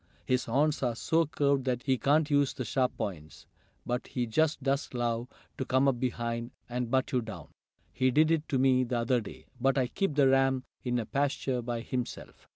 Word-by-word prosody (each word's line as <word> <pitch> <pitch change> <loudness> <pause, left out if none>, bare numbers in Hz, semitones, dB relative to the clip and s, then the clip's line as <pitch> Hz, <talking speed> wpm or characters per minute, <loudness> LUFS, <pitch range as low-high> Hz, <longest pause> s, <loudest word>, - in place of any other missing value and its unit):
"His 125 -1 +1
horns 145 +6 +1
are 120 -3 0
so 165 +6 +1
curved 140 -2 +1
that 125 -2 -1
he 135 -2 +2
can't 150 +4 +2
use 145 -1 +3
the 130 - -4
sharp 130 +2 0
points, 80 -6 -6 0.4
but 125 +1 -2
he 125 -2 -2
just 145 +5 +1
does 140 +1 0
love 120 0 -1 0.3
to - - 0
come 130 +1 +2
up 130 -3 +1
behind 120 -2 -2 0.2
and 125 -1 -3
butt 130 +1 +1
you 125 - +1
down. 110 -2 -8 0.4
He 130 0 +2
did 155 +5 +4
it 160 -2 +1
to 135 - +1
me 130 -1 +4
the 125 0 -1
other 120 +1 +1
day. 105 - -10
But 135 +2 +2
I 130 - +3
keep 170 +5 -2
the 140 -2 +5
ram 135 -1 +3 0.2
in 125 -1 0
a 115 - -2
pasture 135 -2 -1
by 120 -1 -3
himself." 125 0 -6
130 Hz, 205 wpm, -30 LUFS, 120-140 Hz, 0.4 s, the